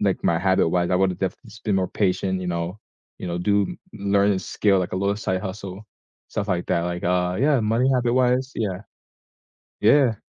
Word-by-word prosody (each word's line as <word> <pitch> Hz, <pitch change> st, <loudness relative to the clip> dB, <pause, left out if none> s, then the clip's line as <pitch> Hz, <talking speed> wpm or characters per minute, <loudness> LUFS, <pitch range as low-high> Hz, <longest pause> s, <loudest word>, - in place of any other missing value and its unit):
like 100 Hz, -2 st, +1 dB
my 85 Hz, -, +1 dB
habit-wise, 90 Hz, -2 st, +2 dB
I 90 Hz, -, +3 dB
would've 95 Hz, -1 st, +1 dB
definitely 95 Hz, +4 st, -4 dB
just 110 Hz, -, -15 dB
been 105 Hz, -3 st, +1 dB
more 90 Hz, -, -1 dB
patient, 95 Hz, 0 st, +1 dB
you 90 Hz, -, -4 dB
know? 85 Hz, +4 st, -3 dB, 0.4 s
You -, -, -5 dB
know, 85 Hz, -1 st, -2 dB
do 100 Hz, +3 st, +1 dB, 0.4 s
learn 100 Hz, 0 st, +2 dB
a 95 Hz, -, 0 dB
skill, 100 Hz, 0 st, +1 dB
like 90 Hz, 0 st, -2 dB
a -, -, -1 dB
little 100 Hz, +1 st, +1 dB
side 95 Hz, -3 st, -2 dB
hustle, 95 Hz, -1 st, -6 dB, 0.5 s
stuff 105 Hz, -1 st, -3 dB
like 85 Hz, -, -4 dB
that, 85 Hz, -2 st, +1 dB
like, 90 Hz, 0 st, -5 dB
uh 90 Hz, 0 st, +1 dB
yeah, 145 Hz, -2 st, +4 dB
money 115 Hz, +4 st, +2 dB
habit-wise, 125 Hz, +1 st, +2 dB
yeah. 95 Hz, -4 st, -2 dB, 1.0 s
Yeah. 120 Hz, +2 st, +5 dB
95 Hz, 195 wpm, -23 LUFS, 90-110 Hz, 1.0 s, Yeah